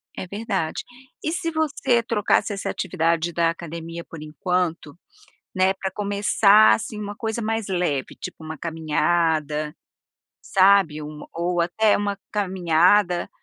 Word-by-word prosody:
É 185 - -6
verdade. 200 -5 -3 0.4
E 315 - -1
se 340 -1 -2
você 280 -6 +1
trocasse 210 -2 +1
essa 195 - -4
atividade 170 -2 -1
da 165 0 +2
academia 165 0 -6
por 165 -2 -11
enquanto, 165 -1 -2 0.6
né, 185 0 +3
para 190 0 -4
começar 205 +1 +4
assim 220 -1 -5
uma 205 0 -6
coisa 225 0 -3
mais 225 -1 -2
leve, 175 -8 -1
tipo 160 - -9
uma 155 0 -6
caminhada, 155 -1 0 0.7
sabe? 190 -6 +3
Um 150 0 -8
ou 175 +1 -1
até 205 +5 +2
uma 205 -1 -2 0.2
caminhada 180 -1 +2
180 Hz, 130 wpm, -23 LUFS, 165-205 Hz, 0.7 s, começar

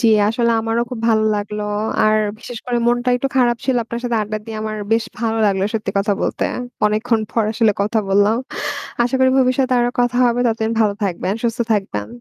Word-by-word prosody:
জী 235 - +3 0.2
আসলে 235 +1 +1
আমারও 225 +1 0
খুব 245 -3 -5
ভালো 220 -1 +3
লাগলো। 210 +1 -4 0.4
আর 215 0 +4 0.2
বিশেষ 240 0 -8
করে 245 -1 0
মনটা 245 +1 +1
একটু 270 +2 -1
খারাপ 240 -2 +3
ছিল। 260 -2 +1
আপনার 235 +1 -5
সাথে 240 -1 0
আড্ডা 215 +1 -3
দিয়ে 225 -1 -6
আমার 215 0 -3 0.2
বেশ 225 0 +2
ভালো 225 -1 -1
লাগলো 195 -1 +1
সত্যি 215 -2 -1
কথা 205 +1 +1
বলতে। - - -1 0.4
অনেকক্ষণ 220 +2 +1
পর 230 - +2
আসলে 225 -1 +3
কথা 215 +2 0
বললাম 205 +3 +3 0.7
আশা 245 +2 0
করি 260 0 +5
ভবিষ্যতে 255 0 +2
আরো 240 0 +2
কথা 245 0 0
হবে। 240 0 +1
ততদিন 225 -1 -1
ভালো 210 -2 +3
থাকবেন, 185 0 -1
সুস্থ 235 0 -1
থাকবেন। 195 - -1
225 Hz, 195 wpm, -19 LUFS, 215-240 Hz, 0.7 s, করি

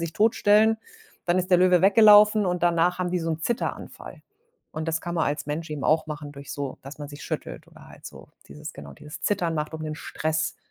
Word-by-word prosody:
sich 165 -1 -4
totstellen, 220 0 +3 0.5
dann 175 +1 +2
ist 185 +1 -2
der 180 - +6
Löwe 180 -1 +4
weggelaufen 210 +1 +6
und 180 -1 -2
danach 175 +1 +2
haben 180 -1 -2
die 180 - 0
so 165 0 -2
'n 160 0 -3
Zitteranfall 235 +7 -5 0.5
und 155 +1 -5
das 160 0 -1
kann 175 0 -4
man 160 - +2
als 145 +1 -3
Mensch 155 +2 -4
eben 145 -3 -5
auch 160 +1 +2
machen 150 -1 -7
durch 140 0 -9
so 140 -2 -5
dass 140 +3 -10
man 145 -1 -7
sich 145 0 -11
schüttelt - - -6
oder - - -16
halt - - -13
so - - -12 0.2
dieses - - -9
genau, 70 -1 -11
dieses 150 0 -11
Zittern 175 -5 0
macht, 155 +1 -3
um 160 - -6
den 155 0 -4
Stress 155 0 -3
165 Hz, 225 wpm, -25 LUFS, 150-185 Hz, 0.5 s, der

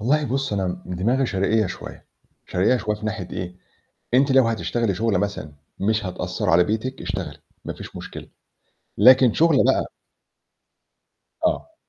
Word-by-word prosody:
والله 145 +7 +2
بُصّ، 135 0 -2
أنا 90 -2 -2
دماغي 115 +9 0
شرقية 105 +2 +1
شوية، - - -9 0.4
شرقية 95 +8 +2
شوية 105 -3 -2
في 105 - -6
ناحية 105 -5 -4
إيه؟ 90 0 -6 0.6
أنتِ 135 +2 +4
لو 130 -3 +5
هتشتغلي 115 -2 -1
شغله 110 -1 +1
مثلًا 100 -7 -3 0.3
مش 105 +1 0
هتأثّر 90 +2 -3
على 85 +1 +5
بيتِك، 110 +7 -3
اشتغلي، - - -5 0.3
ما - - -4
فيش - - -11
مشكلة، - - -8 0.7
لكن 130 -2 +7
شغله 165 +1 +4
بقى - - +2 1.6
آه. 325 - -2
110 Hz, 140 wpm, -23 LUFS, 95-130 Hz, 1.6 s, لكن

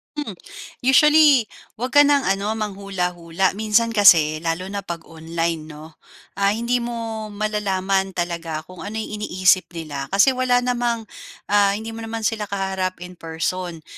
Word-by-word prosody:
Hmm. 295 -8 -4 0.5
Usually 295 0 +5 0.3
'wag 250 +3 -4
ka 290 - +6
ng 285 -1 +3
ano 200 +3 0
manghula-hula. 190 -4 -2
Minsan 220 +3 +1
kasi, 165 -8 +5
lalo 165 +2 -2
na 205 - -3
'pag 170 -4 -7
online 165 -1 -4
'no, 155 +1 -12 0.4
ah, 200 +1 +2
hindi 235 +2 0
mo 230 -2 -5
malalaman 195 -2 -1
talaga 170 -3 -3
kung 185 +1 -14
ano 210 +2 -6
'yong 215 -1 -4
iniisip 185 -2 +2
nila. 145 -4 -5
Kasi 200 - +4
wala 250 -1 +1
namang, 240 -2 -1 0.5
ah, 200 -1 +4
hindi 220 +2 -6
mo 225 - -8
naman 225 0 -5
sila 215 -1 -1
kaharap 190 -2 -3
in 180 0 -12
person. 165 0 -4
200 Hz, 150 wpm, -21 LUFS, 175-225 Hz, 0.5 s, ka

